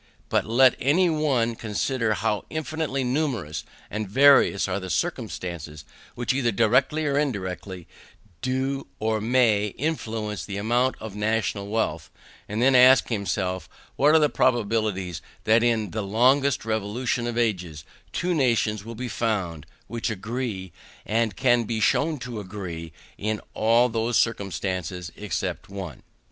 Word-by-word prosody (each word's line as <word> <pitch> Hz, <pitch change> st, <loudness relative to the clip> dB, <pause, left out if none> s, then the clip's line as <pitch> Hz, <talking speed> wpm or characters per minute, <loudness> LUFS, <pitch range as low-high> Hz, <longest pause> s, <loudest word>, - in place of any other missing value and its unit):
But -, -, +1 dB
let 125 Hz, +3 st, +5 dB
any 170 Hz, +6 st, +3 dB
one 135 Hz, -7 st, +1 dB
consider 110 Hz, +2 st, -1 dB
how 105 Hz, -1 st, -1 dB
infinitely 155 Hz, -3 st, -2 dB
numerous 125 Hz, -, -1 dB, 0.2 s
and 110 Hz, -2 st, -4 dB
various 135 Hz, -4 st, +5 dB
are 95 Hz, +1 st, -1 dB
the 95 Hz, -1 st, -7 dB
circumstances 85 Hz, -, -3 dB, 0.3 s
which 120 Hz, +1 st, 0 dB
either 130 Hz, -3 st, +1 dB
directly 130 Hz, +8 st, +2 dB
or 140 Hz, -1 st, +1 dB
indirectly 95 Hz, -, -3 dB, 0.6 s
do 135 Hz, +2 st, -1 dB
or 110 Hz, 0 st, 0 dB
may 110 Hz, -4 st, +2 dB
influence 110 Hz, -9 st, -3 dB
the 100 Hz, -1 st, -5 dB
amount 120 Hz, +5 st, +1 dB
of 110 Hz, -2 st, -7 dB
the 105 Hz, -, -8 dB
national 105 Hz, -2 st, 0 dB
wealth, 100 Hz, -7 st, -2 dB, 0.4 s
and 110 Hz, +3 st, -1 dB
then 135 Hz, +1 st, +5 dB
ask 130 Hz, +1 st, +7 dB
himself 95 Hz, -4 st, -2 dB, 0.3 s
what 150 Hz, +3 st, +4 dB
are -, -, +7 dB
the 150 Hz, -, +4 dB
probabilities 110 Hz, -, 0 dB, 0.2 s
that 110 Hz, +1 st, +4 dB
in 115 Hz, -5 st, +1 dB
the 110 Hz, -, -2 dB
longest 125 Hz, +6 st, +2 dB
revolution 115 Hz, +3 st, -1 dB
of 120 Hz, -1 st, -3 dB
ages 90 Hz, -10 st, -1 dB, 0.3 s
two 180 Hz, 0 st, -1 dB
nations 115 Hz, -, +1 dB
will 115 Hz, +1 st, -8 dB
be 125 Hz, +3 st, -4 dB
found, 100 Hz, -9 st, -2 dB, 0.2 s
which 115 Hz, +1 st, -3 dB
agree, 110 Hz, -3 st, -4 dB, 0.3 s
and 110 Hz, -2 st, 0 dB
can 120 Hz, -1 st, +3 dB
be 110 Hz, 0 st, -2 dB
shown 150 Hz, +8 st, +2 dB
to 125 Hz, -4 st, -6 dB
agree, 90 Hz, -5 st, -6 dB, 0.3 s
in 105 Hz, +1 st, -1 dB
all 115 Hz, +3 st, +4 dB
those 115 Hz, 0 st, 0 dB
circumstances 95 Hz, -5 st, -2 dB
except 95 Hz, -4 st, -4 dB
one? 95 Hz, -8 st, -7 dB
110 Hz, 140 wpm, -25 LUFS, 100-130 Hz, 0.6 s, ask